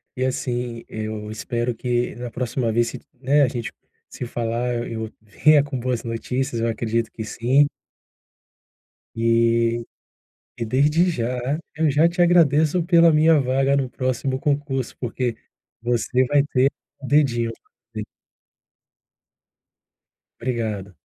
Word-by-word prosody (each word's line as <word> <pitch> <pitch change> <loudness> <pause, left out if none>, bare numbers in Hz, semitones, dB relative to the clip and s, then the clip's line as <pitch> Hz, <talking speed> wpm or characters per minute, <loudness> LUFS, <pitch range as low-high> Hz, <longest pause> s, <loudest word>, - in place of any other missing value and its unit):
e 130 - 0
assim, 120 -2 -3
eu 110 -1 -5
espero 120 +2 -2
que 120 +1 -1
na 120 0 -6
próxima 120 -1 -1
vez 120 +1 +2
citi - - -10 0.2
né, 140 +3 +3
a - - +4
gente 120 -3 -4 0.4
se - - -6
falar 120 +1 -2
eu 120 0 -2 0.2
eu - - -15
venha 150 +8 +4
com 145 -2 -4
boas 125 -1 -2
notícias, 120 +1 -2
eu 115 - +1
acredito 115 0 -1
que 110 - -6
sim. 130 +6 +3 1.5
E 115 0 +2 0.7
e 115 - -3
desde 150 +9 +3
já, 125 +1 -2 0.2
eu 155 -1 +2
já 150 +4 +4
te 175 +1 -1
agradeço 165 -1 +4
pela 170 -1 +6
minha 155 0 +5
vaga 135 +2 +2
no 135 -2 0
próximo 130 +1 -2
concurso 140 -2 -1
porque 120 -1 -2 0.5
você 120 +2 +1
vai 145 0 +3
ter, 130 +2 +4 0.3
o 135 - -7
dedinho 125 -6 +2 0.4
ali - - -4 2.4
Obrigado. 110 -6 -3
125 Hz, 130 wpm, -22 LUFS, 115-140 Hz, 2.4 s, pela